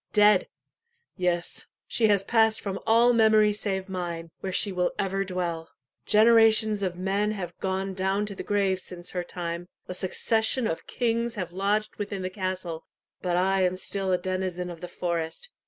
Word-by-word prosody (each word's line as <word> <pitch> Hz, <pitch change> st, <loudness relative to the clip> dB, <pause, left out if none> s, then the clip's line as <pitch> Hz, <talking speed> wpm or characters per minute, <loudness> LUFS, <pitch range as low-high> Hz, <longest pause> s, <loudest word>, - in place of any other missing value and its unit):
Dead! 210 Hz, 0 st, +5 dB, 0.7 s
yes, 175 Hz, -2 st, -1 dB, 0.2 s
she 225 Hz, -, +2 dB
has 200 Hz, -2 st, +3 dB
passed 220 Hz, +1 st, +3 dB
from 195 Hz, -1 st, -4 dB
all 235 Hz, +2 st, +5 dB
memory 215 Hz, -2 st, +5 dB
save 195 Hz, -2 st, -2 dB
mine, 170 Hz, -3 st, -5 dB
where 190 Hz, -, -4 dB
she 200 Hz, +2 st, +3 dB
will 180 Hz, -1 st, 0 dB
ever 195 Hz, 0 st, 0 dB
dwell. 175 Hz, -3 st, -3 dB, 0.4 s
Generations 220 Hz, -1 st, +5 dB
of 180 Hz, -2 st, -2 dB
men 200 Hz, +3 st, 0 dB
have 180 Hz, -4 st, -6 dB
gone 190 Hz, 0 st, -2 dB
down 190 Hz, +2 st, 0 dB
to 205 Hz, -, -6 dB
the -, -, -6 dB
grave 195 Hz, -2 st, +1 dB
since 180 Hz, -1 st, -6 dB
her 180 Hz, -1 st, -2 dB
time 175 Hz, 0 st, -5 dB, 0.2 s
a -, -, -4 dB
succession 220 Hz, +6 st, +1 dB
of 165 Hz, -, -3 dB
kings 235 Hz, -1 st, -1 dB
have 180 Hz, -4 st, -4 dB
lodged 205 Hz, +3 st, 0 dB
within 200 Hz, -2 st, -4 dB
the 185 Hz, -, -3 dB
castle 185 Hz, -4 st, -4 dB, 0.4 s
but 175 Hz, -1 st, 0 dB
I 190 Hz, +1 st, +2 dB
am 180 Hz, 0 st, +2 dB
still 190 Hz, 0 st, -2 dB
a 180 Hz, -, +3 dB
denizen 185 Hz, -1 st, -3 dB
of 165 Hz, -, -10 dB
the 180 Hz, -, -5 dB
forest. 170 Hz, -, -4 dB
190 Hz, 170 wpm, -27 LUFS, 180-210 Hz, 0.7 s, Dead